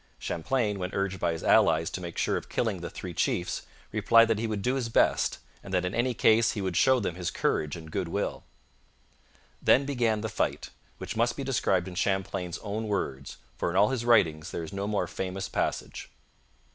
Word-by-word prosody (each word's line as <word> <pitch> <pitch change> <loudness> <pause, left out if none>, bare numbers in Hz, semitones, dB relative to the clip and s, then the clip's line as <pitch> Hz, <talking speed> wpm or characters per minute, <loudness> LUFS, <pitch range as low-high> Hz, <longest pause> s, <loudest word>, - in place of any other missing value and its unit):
Champlain, 105 +3 -1
when 90 0 -3
urged 95 -1 -1
by 85 - +1
his 80 - -5
allies - - +4
to - - -5
make 85 -2 -7
sure - - +1
of - - -5
killing - - -1
the - - -5
three - - -7
chiefs, 90 - -1 0.2
replied 115 +2 +5
that 110 -2 +1
he 115 - -1
would 105 -3 -3
do 125 - +1
his 130 -4 -2
best, - - +2 0.3
and 100 - -9
that 90 0 +1
in 90 - -2
any 120 +1 0
case 115 +2 +4
he 105 - -4
would 95 -2 -2
show 130 +5 +4
them 95 -6 -2
his 90 0 -3
courage 75 -2 -1
and 80 -2 -10
goodwill. - - -2 1.2
Then 135 - +4
began 120 -6 0
the 110 - -2
fight, - - -2 0.3
which - - -6
must 120 +2 +1
be 140 - -3
described 95 -9 +1
in 95 - -7
Champlain's 95 -2 -1
own 110 +2 -3
words, 70 -10 -3 0.2
for - - -1
in 85 - -4
all 100 +2 +5
his 130 -3 -2
writings 85 -9 +3
there 85 - -4
is 80 - -8
no 100 +1 -3
more 105 -1 0
famous 95 0 -4
passage. - - -3
100 Hz, 205 wpm, -28 LUFS, 90-115 Hz, 1.2 s, replied